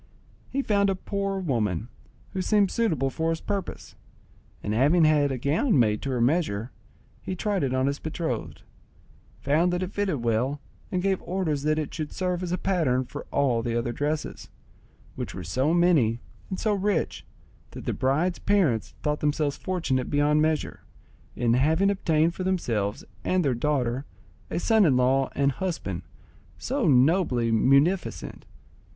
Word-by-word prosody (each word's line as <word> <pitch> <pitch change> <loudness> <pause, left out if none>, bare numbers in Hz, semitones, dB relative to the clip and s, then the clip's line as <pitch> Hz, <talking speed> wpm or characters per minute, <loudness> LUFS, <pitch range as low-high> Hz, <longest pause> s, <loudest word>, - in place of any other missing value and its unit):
He 275 +1 -1
found 200 -3 +2
a 195 - +1
poor 195 +1 -3
woman, 115 - -1 0.5
who 190 - -1
seemed 200 0 +2
suitable 155 - 0
for 160 +4 -1
his 165 0 -1
purpose, 195 0 -5 0.7
and 105 - -1
having 145 +9 +4
had 150 -2 +3
a 130 - -2
gown 150 - +1
made 105 -4 +2
to 140 - -4
her 125 -2 -1
measure, 120 - 0 0.5
he 185 - -4
tried 200 0 -1
it 135 - 0
on 130 0 +1
his 140 +1 -1
betrothed, 155 -7 -4 0.8
found 160 +6 +2
that 180 +1 -1
it 185 - -5
fitted 190 -11 -1
well, 120 +5 0 0.3
and 180 -1 -1
gave 195 -1 +1
orders 170 -6 -1
that 155 +1 +1
it 155 -2 -3
should 155 -2 -4
serve 180 -1 -2
as 180 -2 -3
a 180 - 0
pattern 145 -11 +1
for - - -8
all 130 -5 +1
the 115 0 -2
other 120 0 -1
dresses, 150 +4 -3 0.7
which - - -5
were 90 - -6
so 130 - 0
many 165 -10 +3 0.3
and 190 - -4
so 215 -1 +1
rich 200 -3 -1 0.5
that - - -10
the - - -1
bride's 155 +8 0
parents 170 - +1
thought 150 0 0
themselves 150 -1 0
fortunate 155 -9 -2
beyond 145 +1 +3
measure, 155 -1 0 0.6
in 120 -1 +1
having 160 +10 +3
obtained 165 -4 +1
for 185 - -5
themselves 115 - -1 0.2
and 185 -3 +1
their 135 - +2
daughter 130 0 -1 0.4
a - - -3
son 220 +4 +3
in 140 -8 +4
law 130 +1 +2
and 140 0 +2
a - - -10
husband 130 - -3 0.6
so 260 -5 -1
nobly 130 -3 +3
munificent. 140 - +1
150 Hz, 165 wpm, -26 LUFS, 130-185 Hz, 0.8 s, having